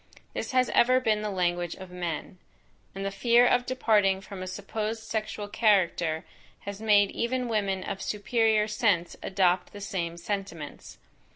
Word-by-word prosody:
This - - -4
has 255 -1 +3
ever 255 +2 +4
been 215 -4 +1
the 210 - -2
language 175 -3 -1
of 185 -1 -11
men, 175 0 -5 0.6
and 195 0 -4
the 195 - -1
fear 235 +4 +4
of 245 0 +2
departing 210 -7 +2
from 195 -1 -9
a 185 - -5
supposed 215 +3 -4
sexual 215 -2 -3
character, 185 -7 +2 0.4
has 200 +1 -7
made 205 -2 +4
even 250 +1 -1
women 200 -4 -1
of 195 -1 -5
superior 215 0 +1
sense 205 -5 +1
adopt 185 -2 +1
the 205 - -8
same 175 -5 -3
sentiments. 175 -5 -6
205 Hz, 155 wpm, -28 LUFS, 185-220 Hz, 0.6 s, ever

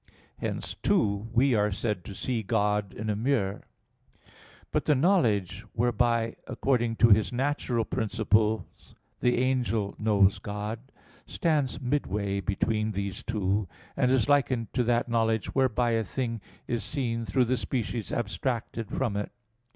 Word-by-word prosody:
Hence, - - -3
too, 110 - +1
we 130 +2 +3
are 105 -1 +2
said 105 -2 -2
to 100 - -8
see 120 +3 -2
God 105 -1 0
in 105 +3 -6
a 105 - +1
mirror. 105 -4 -1 1.0
But - - 0
the 150 - +4
knowledge, 115 - +2
whereby 115 -1 +1
according 120 -4 0
to 115 0 +5
his 105 0 +4
natural 125 -3 0
principles 110 -2 0 0.2
the 125 - +2
angel 125 -5 0
knows 100 -3 +3
God, 105 +5 -5 0.4
stands 150 -6 0
midway 105 -7 -1
between 105 +3 0
these 100 -1 -3
two; 100 -2 -1 0.3
and 125 - +2
is 130 -1 +3
likened 130 -5 +2
to 125 - +2
that 120 +1 +2
knowledge 115 -2 0
whereby 125 -3 +2
a 115 -1 +1
thing 115 +2 -3 0.3
is 120 -1 -1
seen 120 -6 -2
through 115 +4 +2
the 130 +2 +1
species 120 -3 -3
abstracted 115 -1 -2
from 120 -6 -1
it. 105 0 -3
115 Hz, 140 wpm, -28 LUFS, 105-125 Hz, 1.0 s, to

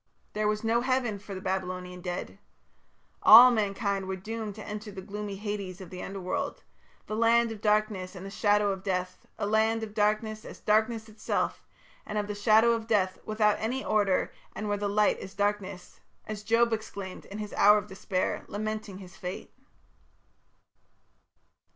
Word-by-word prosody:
There 210 0 0
was 210 +1 0
no 230 +1 +2
Heaven 250 -5 0
for 200 0 -8
the 185 - -6
Babylonian 185 -1 -3
dead. 180 0 -5 0.8
All 245 +3 +10
mankind 200 -3 -1
were 190 - -2
doomed 215 +2 -5
to 215 - -9
enter 210 0 -6
the 190 -1 -8
gloomy 205 0 -5
Hades 200 -2 -5
of 185 -3 -10
the 180 - -7
Underworld, 190 -2 -4 0.4
"the 215 - -4
land 230 +1 +4
of 215 -2 -8
darkness 210 -3 +1
and 185 +1 -8
the 195 - -7
shadow 205 0 +2
of 190 -1 -4
death; 185 -2 -3
a - - -2
land 220 +2 +2
of 210 -2 -6
darkness, 215 +1 0
as - - -10
darkness 220 +1 +1
itself; 215 0 -2 0.4
and 210 - -5
of 210 - 0
the 210 - -4
shadow 220 +3 +5
of 225 -1 -1
death, 190 -4 +1
without 215 -1 +2
any 250 +5 -2
order, 200 -3 +2 0.2
and 215 - -4
where 205 - +1
the 205 0 -2
light 210 +1 +2
is 190 - -9
darkness", 205 -2 -2 0.3
as 215 -1 -5
Job 230 +2 +3
exclaimed 200 -4 -6
in 200 - -8
the 210 -1 -6
hour 210 +1 +7
of 205 - -2
despair, 190 -2 -2
lamenting 215 -1 -4
his 185 -1 -12
fate. 180 +1 -7
210 Hz, 170 wpm, -28 LUFS, 195-220 Hz, 0.8 s, All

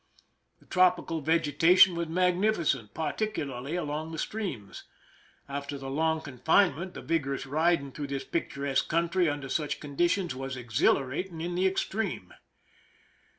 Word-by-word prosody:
The - - -23
tropi 185 -1 +3
cal 165 -1 -2
vegetation 165 +4 +5
was 170 -1 -2
magnificent, 175 - +1
particularly 155 - -3
along 155 -1 -3
the 160 - -6
streams. 155 - -5 0.6
After 140 0 -5
the 135 -1 -6
long 160 +2 +1
confinement 160 +5 +1
the - - -7
vigor 145 -5 0
ous - - -6
riding 155 0 +1
through 145 +1 -5
this 140 -1 -3
picturesque 140 -4 -2
country, 170 +1 +2
under 145 -1 -4
such 150 +2 -2
conditions, 170 +3 0
was 135 0 -5
exhilarating 135 - 0
in 175 +2 -3
the 185 +2 +2
extreme. 190 - -2
160 Hz, 135 wpm, -29 LUFS, 140-175 Hz, 0.6 s, vegetation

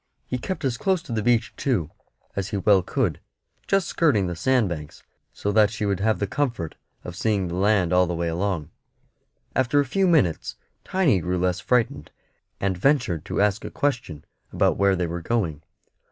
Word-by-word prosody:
He 125 - -3
kept 185 +3 -4
as 125 -3 0
close 185 +1 0
to 145 - -10
the 110 -2 0
beach, 120 +1 +2
too, 100 - -1 0.4
as 100 -2 -2
he 105 - -3
well 100 0 +4
could, - - -1 0.5
just 195 -2 +2
skirting 130 - +2
the 90 -1 -3
sand 120 +6 +2
banks, 75 -4 -7 0.3
so 105 - -2
that 105 0 +5
she 110 0 -5
should 100 -2 0
have 110 +2 +2
the 100 - -1
comfort 115 - -2 0.3
of 90 - -7
seeing 100 -2 0
the - - -5
land 95 -2 +2
all 90 0 +4
the 90 - -2
way 85 0 -1
along. 85 -1 -2 0.8
After 130 +2 +2
a 145 - +2
few 190 +9 +1
minutes 125 - +2 0.3
Tiny 170 - +2
grew 90 +2 -1
less 90 0 0
frightened, 125 +2 0 0.5
and 95 -1 0
ventured 110 - +1
to - - -1
ask 105 0 +1
a - - -5
question 120 - -2 0.3
about - - +2
where 100 -1 +3
they 90 -1 -1
were 85 +1 -4
going. 85 -8 -1
100 Hz, 190 wpm, -24 LUFS, 90-125 Hz, 0.8 s, that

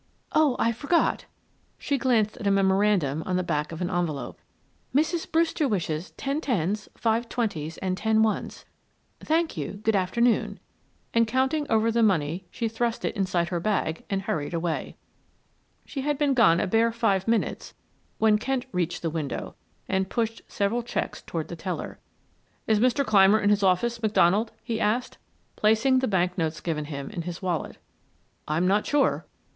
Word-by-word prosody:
"Oh, 305 -5 +3
I 230 - +2
forgot." 285 +9 +1 0.5
She 280 -2 -1
glanced 230 -5 +2
at 215 - -3
a - - +5
memorandum 190 -6 +2
on 185 - 0
the 185 - +1
back 150 -3 -2
of 165 - -7
an 175 - -2
envelope. 160 -7 -2 0.6
"Mrs. 320 +3 +1
Brewster 325 -2 +2
wishes 170 -6 -2
ten 280 +3 -2
tens, 210 - -1
five 230 0 0
twenties, 165 -10 -2
and 185 -1 -2
ten 220 +2 +2
ones. 220 -1 -2 0.5
Thank 320 - 0
you, 145 - -3
good 220 -1 +2
afternoon," 225 +6 +1 0.5
and 230 -1 +3
counting 265 +5 0
over 225 +1 +3
the 235 +1 +2
money 180 -3 +1
she 230 +5 -2
thrust 230 +1 -2
it - - -2
inside 185 -4 0
her 175 - -1
bag 175 -4 -1
and 195 -1 -1
hurried 155 -3 -2
away. 165 -1 -3 0.9
She 275 - -5
had 295 +1 0
been 290 -1 +2
gone 195 -10 +5
a - - +1
bare 225 +4 +2
five 215 -5 0
minutes 230 -1 -1 0.4
when 215 -1 +4
Kent 260 +2 -1
reached 175 -2 -2
the 165 - -1
window 155 -4 -4 0.3
and 190 0 0
pushed 225 -1 -2
several 215 +3 0
checks 240 - -4
toward - - -4
the - - -6
teller. - - -5 0.7
"Is 220 -1 +2
Mr. 255 +4 +2
Clymer 205 -1 +5
in 205 -1 +2
his 205 0 +3
office, 215 +5 +1
McDonald?" 215 0 +3
he 230 -2 -3
asked, 225 +4 0 0.4
placing 225 +5 +3
the 260 - 0
bank 180 -2 0
notes 160 -1 -1
given 155 -3 -3
him 140 -2 -6
in 170 - -4
his 170 +1 -6
wallet. 175 -4 -2 0.7
"I'm 160 +4 +1
not 205 +3 +2
sure." 290 -1 +1
210 Hz, 170 wpm, -26 LUFS, 175-235 Hz, 0.9 s, a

